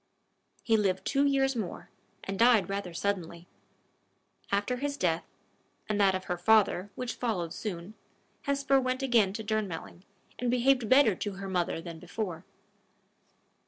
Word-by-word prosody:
He 225 -1 +3
lived 195 -3 0
two 280 0 +2
years 270 -1 +2
more, 210 -7 -5 0.3
and 195 0 -5
died 230 -4 +5
rather 195 -2 -3
suddenly. 170 -2 -3 1.1
After 205 +5 0
his 285 +2 -3
death, 170 - 0 0.6
and 210 -1 0
that 195 -1 +4
of 185 - -3
her 180 -1 -3
father, 205 -1 +3
which 250 -1 -3
followed 180 -9 -2
soon, 195 -2 -6 0.5
Hesper 275 -1 +2
went 255 +1 -1
again 230 -7 +3
to 220 - -5
Durnmelling, 205 -5 -3 0.4
and 245 - 0
behaved 250 -1 +2
better 260 -4 +6
to 205 - -3
her 195 +1 -7
mother 180 -3 -1
than 165 -1 -8
before. 180 -1 -5
205 Hz, 145 wpm, -29 LUFS, 185-250 Hz, 1.1 s, better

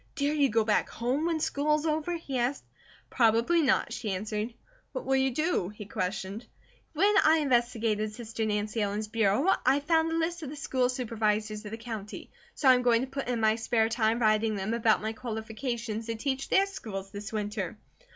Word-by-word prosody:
"Dare 290 -1 0
you 285 -3 +3
go 225 +1 +2
back 215 -1 +1
home 260 +7 -1
when 330 -2 0
school 300 0 +1
is 305 +1 -2
over?" 315 +2 0
he 275 -6 -4
asked. 245 +4 -1 0.5
"Probably 235 +8 +3
not," 275 -4 +2
she 215 - -4
answered. 210 +4 -3 0.4
"What - - -4
will 270 - +2
you 265 0 +3
do?" 305 - 0
he 210 0 -9
questioned. 195 +3 -4 0.5
"When 395 +7 +3
I 315 +1 +5
investigated 235 -6 +1
sister 225 0 -5
Nancy 210 +1 -1
Ellen's 205 +1 -1
bureau 220 - +1 0.2
I 265 +3 +4
found 320 +2 +2
a - - 0
list 335 +1 -1
of 300 - -5
the 295 - -7
School 260 -3 0
Supervisors 215 -3 -1
of - - -5
the 225 - -5
county, 225 -3 -7 0.2
so 280 - 0
I 260 - +9
am 250 - +2
going 240 -2 +3
to 265 - -3
put 275 0 -5
in 245 -2 -1
my 220 0 +4
spare 225 -1 +1
time 225 -1 +1
writing 215 -1 +2
them 195 +3 -2
about 225 -2 +2
my 220 +1 -2
qualifications 225 0 -4
to 230 - -2
teach 265 +3 -2
their 390 - +4
schools 195 - -7
this 205 +1 -7
winter. 210 -2 -3
230 Hz, 200 wpm, -29 LUFS, 215-275 Hz, 0.5 s, I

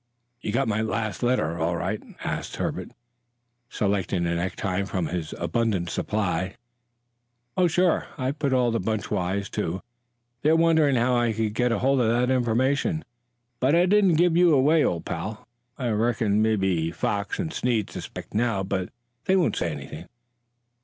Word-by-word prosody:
"You - - -3
got 135 +5 +1
my 110 0 0
last 110 -1 -2
letter 120 -10 +1
all 85 +2 0
right?" 95 +5 -2 0.2
asked - - -3
Herbert, - - -3 0.8
selecting 100 -3 0
a 85 - 0
necktie 95 +2 -1
from 95 -3 -2
his 80 -2 -4
abundant 90 0 0
supply. 95 -3 -1 1.0
"Oh, 180 - +4
sure. 175 +1 +2
I've 130 +2 -2
put 140 -2 0
all 125 -2 +3
the 115 - 0
bunch 110 -3 -2
wise, 95 +3 -1
too. 85 +4 -3 0.6
They're 155 +3 +4
wondering 160 -4 +4
how 120 +1 +2
I 120 -2 +2
got 110 +3 0
hold 130 +3 +2
of 115 - +2 0.2
the 130 - +2
information, 130 - +1 0.5
but 135 +5 +3
I 175 +1 +5
didn't 195 -2 +4
give 170 +1 +3
you 175 -3 +5
away, 150 +4 +4
old 85 -2 -1
pal. 105 +6 -5 0.3
I 125 -2 -2
reckon 110 -1 +1
mebbe 95 -7 +1
Foxy 100 - -1
and 160 - -5
Snead 115 -4 0
suspect - - -8
now, 110 -3 +1
but 95 -1 -2 0.4
they 190 - +3
won't 185 -3 +2
say 85 - -1
anything." 75 +3 -8
110 Hz, 160 wpm, -25 LUFS, 95-135 Hz, 1.0 s, I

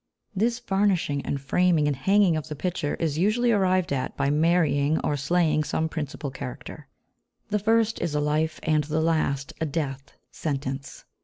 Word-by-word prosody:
This 230 +4 +1
varnishing 195 - 0
and 140 - -1
framing 160 +3 +2
and 145 - +1
hanging 190 +5 +3
of 155 - -3
the 150 - -5
picture 170 -1 -2
is 155 -2 -2
usually 230 +6 +2
arrived 185 -6 +2
at 130 -1 -3
by 140 - +1
marrying 155 -2 +2
or 145 - 0
slaying 155 +1 +1
some 160 +2 -1
principal 145 -3 -5
character; 65 - -8 0.6
the 210 0 +1
first 225 +1 +2
is 170 -3 -2
a - - +2
life, 155 +2 0
and 155 -1 +2
the 155 +1 -1
last 155 -4 0
a 160 - +1
death, 140 -3 -4 0.2
sentence. 135 -2 -4
155 Hz, 165 wpm, -25 LUFS, 145-180 Hz, 0.6 s, hanging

